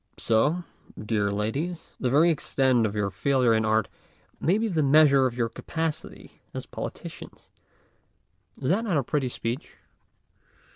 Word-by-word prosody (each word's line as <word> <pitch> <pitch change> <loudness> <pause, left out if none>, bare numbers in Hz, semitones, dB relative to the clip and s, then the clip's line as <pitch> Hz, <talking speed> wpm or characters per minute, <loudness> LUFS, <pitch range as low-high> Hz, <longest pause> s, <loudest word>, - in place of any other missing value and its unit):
So, 150 +11 +2 0.4
dear 105 -1 0
ladies, 135 - -3
the 125 - 0
very 155 +6 +5
extent 130 -6 +2
of 105 - -6
your 100 -2 -1
failure 125 +4 +2
in 110 0 +2
art 110 0 +2 0.5
may 180 +5 +2
be 225 +1 0
the 170 -7 0
measure 140 -2 +5
of 120 - -6
your 115 -2 +1
capacity 160 +7 -5
as - - -4
politicians! - - -8 1.1
Is 135 +3 0
not 220 +5 +1
that 185 -8 +1
a 140 - +1
pretty 135 0 -1
speech? 120 +3 -5
135 Hz, 145 wpm, -26 LUFS, 110-155 Hz, 1.1 s, very